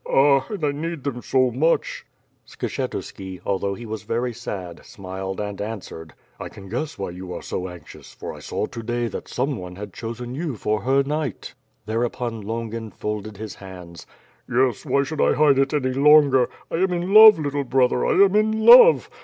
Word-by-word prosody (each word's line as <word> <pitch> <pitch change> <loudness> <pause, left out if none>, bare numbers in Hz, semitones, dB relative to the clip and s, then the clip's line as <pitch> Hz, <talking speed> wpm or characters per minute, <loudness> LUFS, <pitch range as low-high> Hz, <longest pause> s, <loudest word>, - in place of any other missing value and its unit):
Ah! 135 -1 +4
And 205 -6 -6
I 145 - +1
need 160 0 -5
them 130 -3 -4
so 130 -1 +1
much 155 +8 0 0.2
?" - - -43
Skshetuski, 95 -1 -5
although 100 0 -1
he 120 - -9
was 110 0 -5
very 120 +1 -2
sad, 90 -5 -7
smiled 95 0 -7
and 105 -1 -5
answered: 100 -7 -7 0.2
^*I - - -6
can 95 -1 -13
guess 140 +8 -4
why 95 - -4
you 90 +1 -9
are - - -7
so 90 0 -4
anxious, 90 -3 -13
for - - -8
I - - -11
saw - - -3
to 115 - -8
day 120 +1 -2
that - - -7
some 135 +1 -2
one 90 -2 -8
had 100 0 -9
chosen 120 +2 -6
you 150 -1 -4
for 105 0 -1
her 135 +5 +2
knight." 145 -3 -4 0.3
Thereupon 115 +1 -3
Longin 115 +1 -5
folded 105 0 -5
his 110 -1 -7
hands. 90 -3 -12 0.4
"Yes, 125 -2 0
why 140 - +2
should 150 +2 -4
I - - +3
hide 145 -3 +4
it 135 0 +2
any 130 -4 0
longer? 140 -2 +5 0.2
I - - -1
am 190 +1 +1
in 175 +2 -2
love, 215 -2 +10
little 145 -2 -2
brother, 125 -1 +1
I - - +2
am 200 0 +4
in 220 +1 +1
love. - - +8
120 Hz, 195 wpm, -22 LUFS, 105-145 Hz, 0.4 s, love